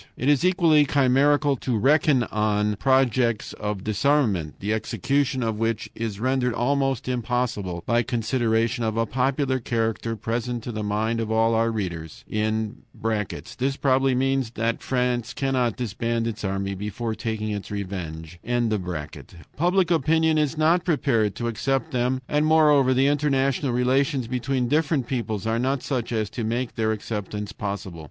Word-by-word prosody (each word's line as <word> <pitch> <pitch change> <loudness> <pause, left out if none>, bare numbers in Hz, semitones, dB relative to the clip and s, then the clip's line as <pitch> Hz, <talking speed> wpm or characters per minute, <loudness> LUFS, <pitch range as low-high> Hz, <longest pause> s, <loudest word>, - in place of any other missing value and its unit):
"It 130 - 0
is 145 0 +3
equally 170 -5 +4
chimerical 140 +2 +3
to 120 -1 -1
reckon 140 - +3
on 105 0 +1
projects 125 -3 +2
of 105 -2 -4
disarmament, 110 - +1
the 105 +2 -1
execution 130 +5 0
of 110 -2 -2
which 115 -1 -1
is 110 -3 -4
rendered 125 0 0
almost 135 0 0
impossible 120 -8 -2
by 120 0 +2
considerations 115 0 0
of 110 0 -2
a 115 - +2
popular 130 +3 0
character 115 -1 -1
present 115 +2 -3
to 120 - -5
the 110 -1 -4
mind 110 +2 -1
of 110 -1 -2
all 115 +1 +3
our 115 +1 +2
readers. 85 -8 -5
[This 110 - -2
probably 135 -1 +3
means 135 -1 +1
that 115 +1 -1
France 125 -1 -1
cannot 130 -4 0
disband 115 0 -2
its 110 -2 -4
army 95 0 -2
before 105 +4 -4
taking 110 -1 -3
its 100 -1 -5
revenge.] 90 -5 -6 1.2
Public 175 +3 +2
opinion 160 0 +3
is 150 +1 0
not 165 +3 +3
prepared 130 - +1
to 120 - -3
accept 130 +3 -1
them, 125 +1 0
and 150 +1 +1
moreover, 150 -5 +5
the 135 +2 +3
international 140 -2 +1
relations 130 +1 +1
between 125 +1 -1
different 150 -1 +1
peoples 115 -6 -3
are 115 +1 0
not 130 +1 0
such 125 -5 -2
as 110 -2 0
to 120 - -4
make 120 +3 -2
their 110 -1 0
acceptance 105 -1 -4
possible. 100 -5 -5
120 Hz, 150 wpm, -24 LUFS, 110-135 Hz, 1.2 s, moreover